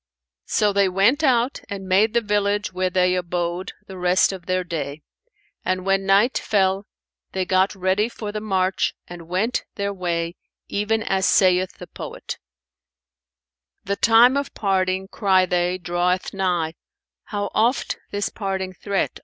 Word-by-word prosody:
So 210 -1 +2
they 200 -1 +3
went 205 - +3
out 250 -1 +2
and 195 -1 -6
made 210 +5 +3
the 235 - +4
village 205 -1 0
where 185 0 0
they 180 0 +2
abode 175 0 -2
the 190 -1 -9
rest 180 +2 +3
of 185 -2 -9
their 185 0 +1
day, 150 -4 -5 0.6
and 185 0 -1
when 195 0 +1
night 200 +6 +4
fell, 195 -1 +1 0.5
they 190 -1 -1
got 190 +2 +2
ready 190 +4 +1
for 215 -3 -6
the 215 0 -4
march 190 -3 0
and 170 -2 -10
went 195 +8 0
their 200 0 -2
way, 170 -2 -2 0.3
even 220 +2 0
as 190 -3 +1
saith 185 -1 +3
the 180 - -9
poet, - - -7 1.4
"'The 200 +1 -2
time 235 +4 +6
of 280 - -3
parting,' 190 -1 0
cry 190 -2 +3
they, 180 0 0
'draweth 175 +1 -1
nigh': 175 -4 0 0.3
* - - -69
'How 205 -1 -3
oft 235 +5 +1
this 205 0 -2
parting 190 -2 -3
threat?' 200 +1 -2
190 Hz, 155 wpm, -22 LUFS, 180-205 Hz, 1.4 s, time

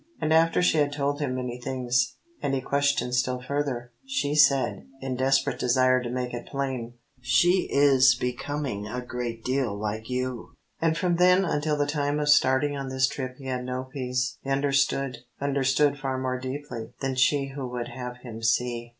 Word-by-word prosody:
And 155 -1 +1
after 165 +2 +4
she 160 -3 +3
had 145 -1 +2
told 145 0 -1
him 135 -4 -1
many 125 -1 -4
things, 125 0 0 0.3
and 135 -1 0
he - - 0
questioned 140 -2 0
still 125 0 +1
further, 125 -2 -3
she 260 - -1
said, 140 -3 +3
in 135 -1 -3
desperate 135 +2 +1
desire 130 +1 +3
to 120 - -4
make 125 0 -3
it 120 - -6
plain 130 -4 -3 0.3
"She 175 +9 +3
is 135 -2 +5
becoming 125 -3 -3
a 125 +3 -4
great 120 -2 -4
deal 130 -5 0
like 110 +2 -4
you!" 125 -1 -3 0.3
And 165 0 +2
from 175 -1 +1
then 180 +2 +5
until 150 -2 0
the 145 - +2
time 145 0 -1
of 150 0 0
starting 145 0 +4
on 135 -1 -4
this 130 0 +2
trip 130 -2 -5
he 135 - -12
had 130 -1 -1
had 125 - -6
no 130 +1 -4
peace. 125 -2 -2
He 135 - -7
understood; 135 -2 +1 0.2
understood 140 +1 +2
far 135 -1 -2
more 130 -1 -2
deeply 130 -3 -6
than 135 -1 -1
she 135 +2 +2
who 135 -1 -5
would 120 -1 -4
have 125 -1 -6
him 115 -2 -8
see. 120 +1 0
130 Hz, 185 wpm, -26 LUFS, 125-145 Hz, 0.3 s, is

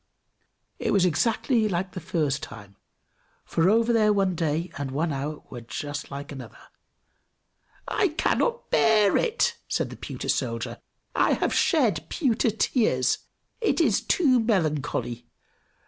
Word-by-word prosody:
it - - -1
was 195 -3 +4
exactly 225 - +1
like 185 0 -2
the 185 - -6
first 150 -4 -1
time, 100 -1 -10 0.7
for 165 +2 +2
over 230 +2 +3
there 215 -2 +4
one 195 -2 +2
day 165 +1 -1
and 140 -2 -4
hour 150 -1 -2
was 120 -2 -8
just 145 +5 -5
like 140 +1 -7
another. 130 -5 -9 1.3
"I 420 - +2
cannot 465 +8 -1
bear 215 -3 +4
it!" 475 0 +1
said - - -1
the - - -7
pewter - - -6
soldier. - - -2 0.4
"I - - +3
have - - 0
shed 215 - +2
pewter 245 -6 +1
tears! 200 - +1 0.4
It 440 - +1
is 245 -12 +3
too 270 -8 +3
melancholy! 150 - -1
185 Hz, 130 wpm, -26 LUFS, 145-230 Hz, 1.3 s, was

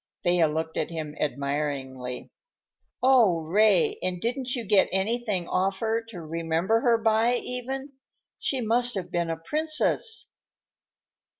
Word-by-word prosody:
Thea 175 -3 +3
looked 160 +1 -3
at 155 - -1
him 155 -3 -5
admiringly. 140 -3 -3 0.7
"Oh, 235 -10 +5
Ray, 215 - +3
and 180 -1 -2
didn't 250 +4 -2
you 240 -2 -4
get 200 -1 +4
anything 200 -1 -1
off 190 +1 0
her, 225 +2 -1
to 215 -7 -9
remember 165 +6 0
her 235 -1 +3
by, 225 +2 +2
even? 265 +3 -4 0.5
She 265 -2 -1
must 240 +2 +1
have 185 -2 -4
been 170 -1 -1
a 165 - -2
princess." 310 - 0
195 Hz, 130 wpm, -26 LUFS, 165-240 Hz, 0.7 s, Oh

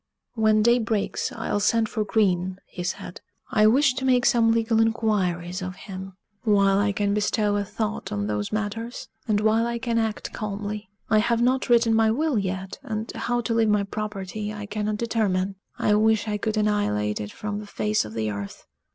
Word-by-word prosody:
"When 215 -2 +3
day 235 +2 +5
breaks, 220 -3 -1
I'll - - -2
send 225 +2 +2
for 215 -1 -2
Green," 190 -3 +1
he 180 - -8
said; 180 0 -5 0.3
"I 215 0 +5
wish 265 +4 +4
to 265 +1 -4
make 250 -2 +3
some 230 -1 +4
legal 225 0 +2
inquiries 190 -6 0
of 185 0 -5
him, 190 0 -8 0.3
while 200 -3 +3
I 205 0 +2
can 200 0 0
bestow 210 0 +1
a 205 - +1
thought 215 +2 -4
on 100 0 -1
those 105 0 -2
matters, 215 +3 -4 0.2
and 210 -2 +2
while 220 +2 +3
I 235 0 -2
can 235 -1 0
act 220 -1 -2
calmly. 210 0 -4 0.2
I 215 - +6
have 235 +1 +2
not 255 +1 +1
written 235 -1 +4
my 225 0 +4
will 280 +1 +1
yet, 190 0 -4
and 220 +1 -4
how 240 0 -1
to 230 - -2
leave 225 -1 +3
my 210 -1 +3
property 210 0 -4
I 210 -1 -6
cannot 210 +1 -2
determine! 200 -4 0 0.2
I 210 - +2
wish 220 +1 +3
I 210 -1 -1
could 220 +1 -1
annihilate 105 - +1
it 105 0 -6
from 210 -1 -4
the 210 - -9
face 105 - 0
of 105 0 -9
the 110 -1 -1
earth." 100 -1 -7
210 Hz, 195 wpm, -25 LUFS, 195-225 Hz, 0.3 s, I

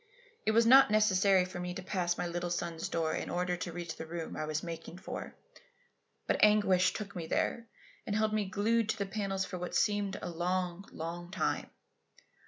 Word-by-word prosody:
It - - +5
was 230 +1 +5
not 265 +1 +8
necessary 195 -3 +4
for 185 0 -7
me 180 0 -4
to 190 - -6
pass 180 -2 -1
my - - -1
little 175 0 -3
son's 170 -1 -3
door 160 -1 0
in - - -3
order 180 0 0
to 175 0 -4
reach 170 -1 -6
the 160 - -6
room 165 0 -5
I 155 - -2
was 155 0 -2
making 170 0 -7
for; 190 - -7 0.9
but - - +1
anguish 190 -4 +5
took 200 -2 -6
me 165 -2 -4
there 230 +7 -1 0.4
and 205 - -1
held 215 0 +1
me 215 -1 +1
glued 220 +4 +1
to 220 - 0
the 200 - -1
panels 195 -1 -2
for 180 - -6
what 180 - -4
seemed 205 -2 +1
a - - -5
long, 180 +2 -2
long 170 +2 -6
time. 190 - -1
185 Hz, 195 wpm, -32 LUFS, 175-205 Hz, 0.9 s, not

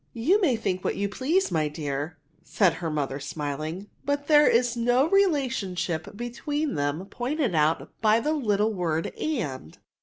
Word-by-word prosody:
'* - - -40
'^Tou 335 - +3
may 290 -10 +3
think 185 -5 -2
what - - -1
you 200 - -1
please, 300 - 0
my 155 -2 +1
dear,'' 150 +1 -4 0.3
said 180 0 +2
her 165 0 -4
mother, 140 -3 -2
smiling, 155 +6 -4
'* - - -39
but 285 0 -1
there 295 -1 +6
is 245 0 +3
no 245 +4 +3
relationship 245 - 0
between 290 +6 -3
them 145 +4 -1
pointed 255 - -2
out 155 0 +2
by 220 0 +4
the 300 +6 0
little 215 -6 +1
word 165 -4 -1
and. 145 - -3
205 Hz, 170 wpm, -26 LUFS, -, 0.3 s, there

